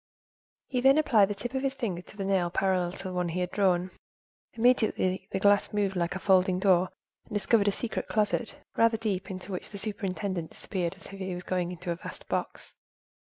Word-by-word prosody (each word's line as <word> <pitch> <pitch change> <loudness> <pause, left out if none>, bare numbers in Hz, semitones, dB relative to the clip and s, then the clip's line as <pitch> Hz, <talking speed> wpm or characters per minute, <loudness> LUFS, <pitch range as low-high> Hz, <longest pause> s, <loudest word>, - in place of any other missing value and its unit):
He 250 -2 -1
then 270 +3 +6
applied 240 -10 +5
the 205 - -3
tip 235 +5 -5
of 265 - -1
his 270 0 -1
finger 210 -10 -3
to 210 - -16
the 195 - -3
nail 190 -3 +2
parallel 185 -1 +1
to - - -8
the 185 -1 -4
one 180 -1 -1
he 175 +2 -2
had 180 0 -1
drawn. 185 -2 +2 0.6
Immediately 220 -6 +2
the 190 - -1
glass 205 +1 +4
moved 200 -2 0
like 175 0 -1
a - - -3
folding 185 -1 +3
door 185 -1 +3 0.4
and - - -11
discovered 205 0 +3
a - - +5
secret 225 +3 -3
closet, 215 +2 0 0.2
rather 230 0 +4
deep, 200 -4 -2
into 185 +1 -6
which 180 - -4
the 205 - -7
superintendent 190 -4 -2
disappeared 180 -4 -3
as - - -13
if 185 -2 -5
going 180 -1 -1
into 180 0 -5
a 170 - -2
vast - - -9
box. - - -3
195 Hz, 200 wpm, -29 LUFS, 180-215 Hz, 0.6 s, then